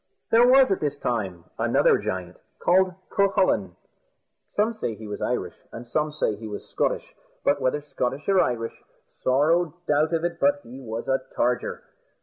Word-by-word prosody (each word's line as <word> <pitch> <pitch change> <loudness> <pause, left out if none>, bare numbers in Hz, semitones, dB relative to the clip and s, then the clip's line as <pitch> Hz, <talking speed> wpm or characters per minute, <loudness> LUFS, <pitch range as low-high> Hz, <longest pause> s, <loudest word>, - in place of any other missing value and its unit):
There 235 +2 +6
was 260 -2 +6
at 195 - +1
that 145 -1 -2
time 95 -10 -2 0.2
another - - +4
giant, 90 -1 -4 0.3
named 185 0 +4 0.2
Cucullin 195 -1 +2 0.8
some 215 +3 +2
say 165 - -3
he 110 - -10
was 105 - -6
Irish, - - -1 0.2
and 115 - -8
some 150 +5 -1
say 150 -8 0
he 110 +1 -7
was 105 -1 -7
Scotch - - -1 0.3
but - - +2
whether 140 +3 +1
Scotch 135 0 -3
or 195 -1 +4
Irish, 115 -5 -1 0.5
sorrow 155 +5 +3
doubt 150 +2 +2
of 165 - -1
it 170 -1 -3
but 145 0 +3
he 125 +3 -10
was 115 -2 -5
a 135 0 +1 0.2
targer. 125 0 0
145 Hz, 165 wpm, -25 LUFS, 115-175 Hz, 0.8 s, There